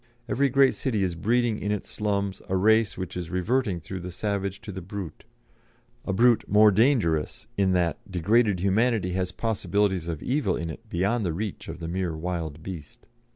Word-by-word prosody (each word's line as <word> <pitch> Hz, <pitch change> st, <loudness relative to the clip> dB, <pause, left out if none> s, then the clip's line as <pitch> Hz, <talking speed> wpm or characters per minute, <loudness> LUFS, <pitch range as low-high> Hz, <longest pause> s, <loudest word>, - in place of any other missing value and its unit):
Every 140 Hz, +2 st, +2 dB
great 135 Hz, +1 st, +5 dB
city 110 Hz, -7 st, -1 dB
is 90 Hz, -2 st, 0 dB
breeding 115 Hz, +5 st, +1 dB
in 105 Hz, -, -2 dB
its 105 Hz, -, -2 dB
slums 100 Hz, -2 st, -2 dB
a 95 Hz, -, +1 dB
race 110 Hz, +2 st, +3 dB
which 95 Hz, -2 st, -5 dB
is 90 Hz, -2 st, -4 dB
reverting 95 Hz, +2 st, 0 dB
through 90 Hz, +3 st, -6 dB
the 90 Hz, +1 st, -6 dB
savage 100 Hz, +1 st, -2 dB
to 105 Hz, -, -7 dB
the 95 Hz, 0 st, -6 dB
brute 95 Hz, -3 st, -7 dB, 0.8 s
a -, -, -1 dB
brute 120 Hz, +4 st, +4 dB
more 105 Hz, +1 st, +6 dB
dangerous 105 Hz, -, +1 dB
in 95 Hz, -2 st, +2 dB
that 85 Hz, -4 st, +1 dB
degraded 100 Hz, +2 st, +2 dB
humanity 100 Hz, 0 st, +2 dB
has 90 Hz, 0 st, -1 dB
possibilities 100 Hz, -4 st, 0 dB
of 80 Hz, -3 st, -4 dB
evil 140 Hz, +4 st, 0 dB
in 85 Hz, -1 st, -3 dB
it 115 Hz, +7 st, -12 dB
beyond 100 Hz, +7 st, 0 dB
the 85 Hz, -4 st, -1 dB
reach 105 Hz, +3 st, -5 dB
of 85 Hz, +1 st, -7 dB
the 80 Hz, -, -5 dB
mere 90 Hz, -2 st, -2 dB
wild 80 Hz, -2 st, -4 dB
beast. 80 Hz, -6 st, -9 dB
95 Hz, 185 wpm, -26 LUFS, 90-110 Hz, 0.8 s, more